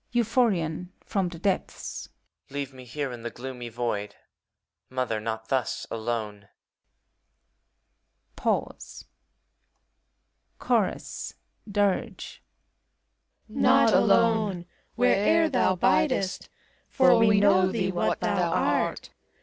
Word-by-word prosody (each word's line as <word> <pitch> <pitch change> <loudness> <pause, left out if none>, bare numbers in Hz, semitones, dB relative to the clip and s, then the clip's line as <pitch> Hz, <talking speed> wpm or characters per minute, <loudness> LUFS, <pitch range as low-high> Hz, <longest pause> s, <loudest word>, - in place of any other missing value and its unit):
BUPH(MaoN 220 -9 +1 0.2
(from 195 -4 -1
the 170 -2 -10
<teplM). 195 +1 -3 0.4
Leave 140 -1 -5
me 130 -1 -12
here^ 135 +2 -4
in 120 - -8
the 120 - -4
i^oomy 125 -1 -8
Void, 105 -3 -3 0.7
Mother, 125 -4 -2
not 110 0 -5
tiios 130 -3 -1
alone! 110 -3 -4 1.9
Pause. - - -3 1.5
CHORUS - - -1 0.3
[Dir^.] 200 -1 0 1.3
Not - - +4
alone! 215 -6 +3 0.3
where'er 250 +7 +3
thou 250 -8 +2
biifest; 190 - +1 0.4
For 265 -2 +5
we 210 -2 +5
know 190 -2 +4
thee 190 -4 -1
what 175 - -1
thou - - +1
art. - - 0
175 Hz, 95 wpm, -26 LUFS, -, 1.9 s, For